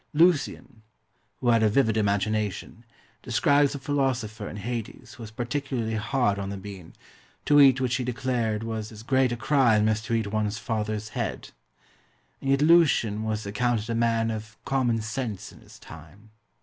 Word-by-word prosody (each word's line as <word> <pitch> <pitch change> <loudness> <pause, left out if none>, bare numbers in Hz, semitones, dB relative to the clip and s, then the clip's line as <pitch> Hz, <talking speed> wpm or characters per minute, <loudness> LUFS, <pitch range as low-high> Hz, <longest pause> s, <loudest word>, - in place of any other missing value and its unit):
Lucian, 145 -7 +1 0.6
who 125 - +1
had 115 -1 +4
a 110 - +4
vivid 110 -1 +2
imagination, 105 +1 -1 0.4
describes 145 0 +2
a - - -3
philosopher 130 -7 -2
in - - -8
Hades 120 +2 -6
who 125 - -13
was 110 - -7
particularly 120 0 -3
hard 110 -2 0
on 100 0 -4
the 100 - -5
bean, 95 -4 -10 0.5
to 145 0 +6
eat 135 -2 +6
which 125 -1 0
he 130 - -2
declared 120 -3 -1
was 110 -1 -4
as 110 0 -11
great 130 0 +2
a 120 - -2
crime 120 -5 +3
as 110 0 +1
to 115 +1 -2
eat 115 -2 0
one's 105 -1 -1
father's 110 -1 -3
head. - - -4 0.9
And 135 - -3
yet 135 +1 +3
Lucian 150 -10 +4
was 110 -1 -3
accounted 115 +2 -1
a - - 0
man 115 -1 +1
of 110 0 -7
common 125 -5 +1
sense 110 -2 -4
in - - -16
his - - -16
time. 85 +8 -14
115 Hz, 170 wpm, -26 LUFS, 105-130 Hz, 0.9 s, to